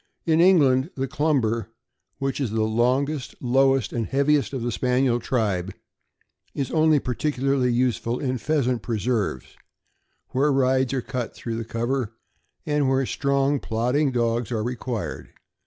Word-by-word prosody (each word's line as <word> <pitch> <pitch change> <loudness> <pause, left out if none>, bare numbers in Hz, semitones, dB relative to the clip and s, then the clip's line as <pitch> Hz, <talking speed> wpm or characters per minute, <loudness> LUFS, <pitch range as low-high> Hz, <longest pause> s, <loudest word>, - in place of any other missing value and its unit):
In 160 0 +3
England, 145 -6 +4
the 135 0 -2
Clumber, 125 -7 0 0.5
which 135 +1 -2
is 130 - 0
the 110 +1 0
longest, 125 +6 0
lowest, 135 -1 +2
and 115 -2 -2
heaviest 140 -3 +2
of 130 -4 -4
the 120 - -1
Spaniel 125 +1 +1
tribe, 100 -7 -1 0.8
is 135 -3 -2
only 155 -1 +4
particularly 135 -1 0
use 125 0 +1
ful 120 +2 -3
in 130 -3 -2
pheasant 130 -2 0
preserves, 110 - -1 0.8
where 140 +3 +2
rides 130 -1 +2
are 130 - -2
cut 125 -3 -4
through 115 -1 -5
the 115 - -3
cover, 115 0 -2 0.5
and 150 -2 +1
where 135 0 +2
slow, - - -5
strong, 140 0 +1
plodding 125 +6 0
dogs 120 -1 0
are 110 -2 -1
required. 120 -1 -4
130 Hz, 145 wpm, -24 LUFS, 115-140 Hz, 0.8 s, England